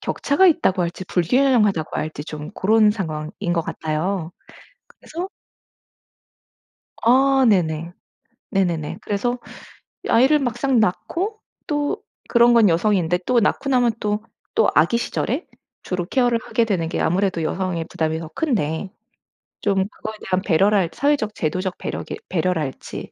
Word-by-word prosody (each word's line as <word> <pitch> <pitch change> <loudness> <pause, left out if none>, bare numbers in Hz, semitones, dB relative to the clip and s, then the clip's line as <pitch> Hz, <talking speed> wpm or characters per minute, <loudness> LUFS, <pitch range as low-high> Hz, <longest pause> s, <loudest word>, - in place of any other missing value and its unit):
격차가 285 +7 +2
있다고 300 - +3
할지 175 +2 -4
불균형하다고 210 - +2
할지 155 -1 -4
좀 150 +1 -7
고런 215 +1 +4
상황인 160 -7 -4 0.2
것 170 - +1
같아요. 160 +3 -3 0.6
그래서 350 +4 -7 1.7
아 265 +3 +4
네네. 170 -4 +1 0.6
네네네. 175 -6 0
그래서 240 +5 -1 0.7
아이를 270 +6 +4
막상 250 0 +1
낳고 345 - -1 0.3
또 295 +5 -1 0.3
그런 235 0 +5
건 225 -4 +6
여성인데 180 -1 +2
또 250 -1 +3
낳고 235 +6 0
나면 245 -3 +3
또 210 0 -1 0.3
또 - - +4
아기 235 - +4
시절에 255 +5 -2 0.4
주로 180 -2 -3
케어를 245 +3 +2
하게 235 - +1
되는 180 -7 -1
게 - - -2
아무래도 180 0 +1
여성의 175 0 -2
부담이 160 0 -1
더 165 - -7
큰데 195 - -1 0.7
좀 200 -1 +1
그거에 220 +1 -8
대한 185 0 0
배려랄지 190 -1 +2
사회적 280 -7 +1
제도적 185 +3 -2
배려게 - - -5
배려랄지 160 -5 -3
200 Hz, 290 characters per minute, -21 LUFS, 170-245 Hz, 1.7 s, 건